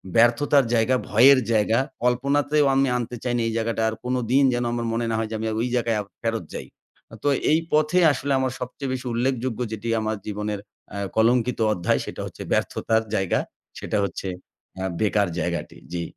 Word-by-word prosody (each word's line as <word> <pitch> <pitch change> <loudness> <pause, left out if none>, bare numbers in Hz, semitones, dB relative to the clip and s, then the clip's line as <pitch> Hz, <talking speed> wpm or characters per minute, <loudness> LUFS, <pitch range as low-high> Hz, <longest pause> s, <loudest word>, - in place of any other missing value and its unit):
ব্যর্থতার 120 +4 +4
জায়গা 120 +3 +3
ভয়ের 130 +5 +7
জায়গা, 110 +2 +3 0.2
কল্পনাতেও 140 +4 +2
আমি 135 0 +3
আনতে 120 0 -4
চাই 120 -1 -1
না - - 0
এই 115 - -2
জায়গাটা। 115 0 -1
আর 110 - -5
কোনদিন 125 +2 +1
যেন 120 0 0
আমার 120 -1 -2
মনে 115 0 -1
না 115 - 0
হয় 110 - -1
যে, 110 - -4
আমি 110 - -2
ওই 125 - 0
জায়গায় 115 -2 +1 0.2
ফেরত 115 -4 -1
যাই। - - -6 0.6
তো - - 0 0.2
এই 160 - +4
পথে 155 +4 +3
আসলে 140 0 -3
আমার 130 -1 0
সবচেয়ে 130 +2 -5
বেশি 130 0 -5
উল্লেখযোগ্য 125 0 -1
যেটি 110 +1 -5
আমার 110 -1 -2
জীবনের 105 0 -3 0.4
আ - - -4 0.2
কলঙ্কিত 120 +2 +2
অধ্যায় 85 -3 0
সেটা - - -6
হচ্ছে - - -9
ব্যর্থতার 110 0 +1
জায়গা। 95 -3 +1 0.4
সেটা - - -2
হচ্ছে 95 +1 -5 0.5
আ - - -2 0.2
বেকার 105 -2 +2
জায়গাটি, 85 -3 -3 0.2
জি। 85 -1 -2
120 Hz, 180 wpm, -24 LUFS, 110-130 Hz, 0.6 s, ভয়ের